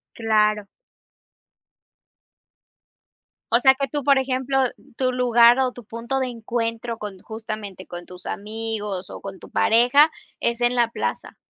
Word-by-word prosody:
Claro. 215 -2 +1 2.9
O 235 - +5
sea, 265 0 +6
que 275 0 -2
tú 290 +1 -2
por 275 -1 +5
ejemplo, 265 0 -1 0.4
tu 255 -1 0
lugar 240 0 +5
o 255 -1 +1
tu 245 -2 -12
punto 235 +5 -4
de 260 -1 -1
encuentro 230 0 -3
con 205 -3 -7
justamente, 215 -4 -7
con 175 0 -8
tus 180 0 -12
amigos 210 -3 -4
o - - -8
con 195 -1 -8
tu - - -13
pareja 250 +7 +4 0.3
es 235 0 0
en 240 +1 +2
la 240 -1 +3
plaza. - - -4
235 Hz, 140 wpm, -23 LUFS, 215-255 Hz, 2.9 s, sea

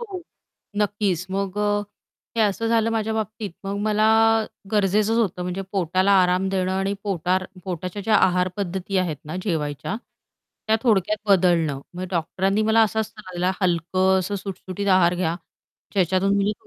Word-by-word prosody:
हो. 395 -6 -6 0.5
नक्कीच 205 -3 0
मग 195 0 -2
अ, 205 0 +1 0.5
हे - - +2
असं 210 +2 0
झालं 230 0 +2
माझ्या 220 -1 -1
बाबतीत 215 -1 -3
मग 200 +1 -3
मला 215 0 +2 0.7
गरजेचंच 210 +2 +2
होतं 190 -5 0
म्हणजे 180 +2 -3
पोटाला 185 +1 +2
आराम 180 +1 +1
देणं 185 -1 0
आणि 195 +1 0
पोटार 185 -1 0 0.2
पोटाच्या 185 +2 -4
ज्या 215 +2 +3
आहार 180 -1 +3
पद्धती 190 0 -3
आहेत 175 -5 -1
ना, 155 +3 -5
जेवायच्या, 155 -2 -2 0.7
त्या 220 0 +3
थोडक्यात 215 -3 +2
बदलणं. 170 -7 +3
मग 180 +1 -4
डॉक्टरांनी 190 +4 0
मला 220 +1 +4
असा 220 0 +1
सल्ला 210 -3 -11
दिला 180 +1 +1
हलकं 185 +1 +2
असं 190 +2 -2
सुटसुटीत 195 0 -5
आहार 185 -2 +4
घ्या, 175 -2 -1 0.6
ज्याच्यातून 190 +1 +2
मी 200 +1 +1
195 Hz, 150 wpm, -23 LUFS, 180-210 Hz, 0.7 s, मला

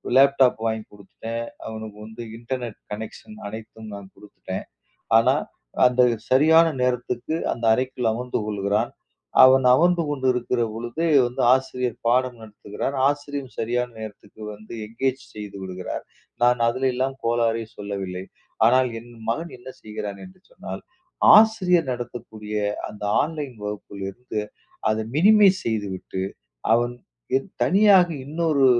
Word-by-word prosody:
Laptop 135 -3 +5
வாங்கி 110 -1 -1
கொடுத்துட்டேன். 115 +3 -6 0.2
அவனுக்கு 110 -1 -7
வந்து 110 +2 -9 0.2
இன்டர்நெட் 120 -2 -5
கனெக்ஷன் 110 0 -8
அனைத்தும் 110 0 -9
நான் 100 -1 -11
கொடுத்துட்டேன். 95 -2 -7 0.5
ஆனா, 125 +4 +4 0.5
அந்த 125 0 +4 0.3
சரியான 160 +5 +6
நேரத்துக்கு 125 +3 -1 0.2
அந்த 115 - -5
அறைக்குள் 125 -2 0
அமர்ந்து 125 +2 -2
கொள்கிறான். 105 +2 0 0.5
அவன் 130 0 +7
அமர்ந்து 170 +5 +4
கொண்டிருக்கிற 125 -3 0
பொழுது 120 +8 -3 0.2
வந்து 120 - -4
ஆசிரியர் 125 -2 -1
பாடம் 125 0 +2
நடத்துகிறார், 105 +4 -5
ஆசிரியரும் 145 -2 -3
சரியான 125 +2 0
நேரத்துக்கு 110 0 -10
வந்து 110 +2 -12
என்கேஜ் 130 +4 -2
செய்து 105 -2 -7
விடுகிறார், 95 -1 -5 0.4
நான் 125 0 +4
அதிலெல்லாம் 130 +2 0
கோளாறே 115 -1 +1
சொல்லவில்லை. 95 -3 -5 0.4
ஆனால், 130 +1 +4
என் 120 +1 -15 0.2
மகன் 165 +9 -2
என்ன 120 - -11
செய்கிறான்? 105 -2 -6
என்று 185 0 -16
சொன்னால், - - -7 0.5
ஆசிரியர் 185 -8 +4
நடத்தக்கூடிய 115 -3 -6 0.3
அந்த 105 - -10 0.2
ஆன்லைன் 150 -5 -4
வகுப்பிலிருந்து 105 +2 -5 0.5
அதை 110 +1 0
மினிமைஸ் 195 +1 +6
செய்துவிட்டு, 100 -4 -3 0.5
அவன் 120 +1 +2 0.7
தனியாக 195 -2 +6 0.2
இன்னொரு 155 -2 +2
120 Hz, 115 wpm, -24 LUFS, 110-135 Hz, 0.7 s, அவன்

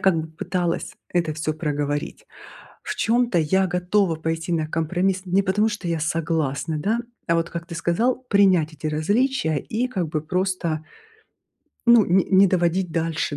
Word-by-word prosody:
как 190 -3 +3
бы 160 - -7
пыталась 170 +2 -2 0.2
это 165 -4 0
всё 155 0 -2
проговорить. 145 -2 -3 0.6
В - - -4
чём-то 235 -4 +2
я 190 +5 +2
готова 180 0 +1
пойти 160 +2 -3
на 160 -2 0
компромисс 180 +4 0
не 190 +2 +2
потому, 210 +3 +2
что 210 -4 -5
я 165 -1 -1
согласна, 160 -1 -1
да, 220 +9 0 0.3
а 170 - +3
вот 165 +1 0
как 170 0 -6
ты 170 - -7
сказал, 175 +10 +1
принять 185 -6 +4
эти 155 +1 -5
различия 160 - +1
и 235 - -2
как 185 -10 -3
бы 155 -1 -2
просто 180 -2 -1 1.1
ну, 235 -3 +7
ни 185 +1 +3
не 195 0 +5
доводить 175 0 +1
дальше, 160 -2 -1
170 Hz, 160 wpm, -23 LUFS, 160-190 Hz, 1.1 s, ну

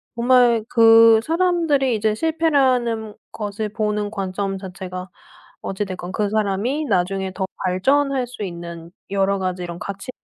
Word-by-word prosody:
정말 240 -1 +4
그 225 -1 +7
사람들이 325 -7 +1
이제 215 0 0
실패라는 255 -8 +1 0.2
것을 210 0 -4
보는 210 -1 -2
관점 195 -1 -3
자체가 185 -1 -7 0.5
어찌 195 +2 -3
됐건 185 -2 -7
그 210 0 0
사람이 215 +8 -1
나중에 190 0 0
더 190 0 -2 0.2
발전할 265 +8 +1
수 245 -2 -9
있는 170 -2 -7 0.2
여러 200 0 +1
가지 185 -1 -3
이런 175 -1 -6
가치 200 +6 -7
210 Hz, 280 characters per minute, -21 LUFS, 190-250 Hz, 0.5 s, 그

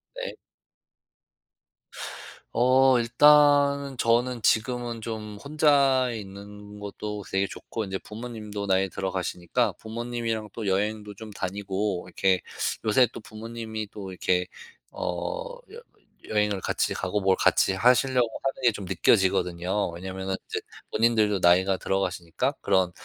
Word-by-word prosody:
네. - - -5 2.2
어 130 +1 +5
일단은 140 +2 +5
저는 120 +1 +1
지금은 120 +1 0
좀 110 -2 -6
혼자 140 -3 +3
있는 105 0 -9
것도 105 0 -6
되게 95 +1 +1
좋고 110 +3 -6
인제 95 -1 -3
부모님도 105 -2 -7
나이 95 0 +3
들어가시니까 95 +4 -1
부모님이랑 115 -1 -4
또 115 - -5
여행도 105 +2 -1
좀 110 +2 -9
다니고 100 -1 -3
이렇게 95 +1 +2 0.5
요새 115 +4 +5
또 - - -8
부모님이 110 0 -6
또 95 -3 -7
이렇게 90 0 0 0.4
어 - - -4
여 470 +2 -10 0.5
여행을 105 -2 +1
같이 - - 0
가고 100 +2 -2
뭘 95 -1 +3
같이 95 - +3
하시려고 125 +3 +3 0.2
하는 135 0 -2
게 120 - +6
좀 105 -1 -7
느껴지거든요. 95 0 +1
왜냐하면은 95 +2 -5
인제 - - -3 0.3
본인들도 110 -3 +2
나이가 95 +2 +4
들어가시니까 95 - -1
그런 95 -3 +2
105 Hz, 285 characters per minute, -26 LUFS, 95-120 Hz, 2.2 s, 게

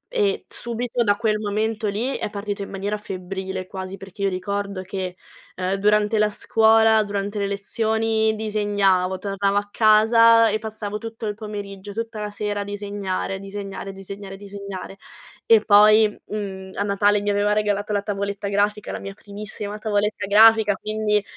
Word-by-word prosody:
e 415 -1 +1
subito 240 +1 -2
da 205 -1 +3
quel 215 -1 0
momento 215 +1 -1
lì 225 +7 -1
è - - -3
partito 205 0 -4
in 195 - -5
maniera 200 +2 -3
febbrile 190 -1 -5
quasi, 190 +1 -7
perché 195 0 -11
io 200 - +2
ricordo 200 +1 -3
che, 185 -1 -5 0.4
uhm, 185 +1 -1
durante 210 +2 +2
la 210 0 +3
scuola, 220 +1 +4
durante 205 0 -3
le 200 - 0
lezioni 220 +2 0
disegnavo, 205 -4 +1
tornavo 200 0 -1
a 205 0 -1
casa 230 +1 +6
e 215 - 0
passavo 215 -1 -5
tutto 225 0 -7
il 210 - -1
pomeriggio, 205 -2 -7
tutta 225 0 -5
la 210 0 -3
sera 205 0 -3
a 200 - -1
disegnare, 200 -2 -3
a - - -4
disegnare, 195 0 -6
disegnare, 195 0 -9
disegnare 200 -1 -8 0.5
e 225 -2 +7
poi, 215 +1 +7 0.2
mhmm, 190 -2 -6
a 200 - 0
Natale 205 +1 +2
mi 205 0 0
aveva 205 +1 +2
regalato 210 0 0
la 205 -1 0
tavoletta 200 0 -3
grafica, 205 +1 0
la - - -4
mia 195 0 -7
primissima 205 +1 -7
tavoletta 210 -2 -1
grafica, 215 0 +6
quindi 210 0 0
205 Hz, 165 wpm, -23 LUFS, 200-215 Hz, 0.5 s, e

